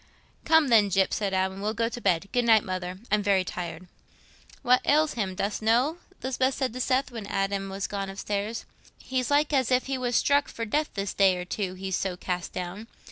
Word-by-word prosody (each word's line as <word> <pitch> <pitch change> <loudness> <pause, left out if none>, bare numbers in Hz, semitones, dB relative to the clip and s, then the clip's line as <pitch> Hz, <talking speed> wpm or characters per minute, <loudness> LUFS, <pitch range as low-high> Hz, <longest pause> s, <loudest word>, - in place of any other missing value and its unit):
"Come, 320 -3 +5
then, 215 -4 +5
Gyp," 190 0 +2
said 200 -2 -1
Adam, 190 0 -1
"we'll 215 +2 -1
go 230 +1 +1
to 240 +1 -6
bed. 185 -2 +1
Good 245 -1 +1
night, 225 -2 +5
Mother; 185 -1 -4
I'm 210 0 +3
very 200 -2 +2
tired." 180 0 -6 0.8
"What 250 0 +4
ails 305 +1 +3
him, 195 -5 -2
dost 200 +3 -2
know?" 245 +9 +2 0.3
Lisbeth 260 +1 0
said 260 -4 -1
to 255 - -4
Seth, 260 +1 +1
when 225 -4 -7
Adam 195 0 -1
was 195 0 -3
gone 195 -1 -4
upstairs. 205 +3 -3 0.3
"He's 255 -1 -2
like 295 +1 +2
as 260 -4 +2
if 255 0 +2
he 265 -1 -2
was 245 -1 -1
struck 285 +3 +3
for 230 - -5
death 300 +8 0
this 195 -1 -2
day 190 -2 +4
or 180 - -5
two—he's 190 -1 -3
so 185 -2 -2
cast 180 -1 -3
down. 185 +5 -6
210 Hz, 205 wpm, -27 LUFS, 190-255 Hz, 0.8 s, Come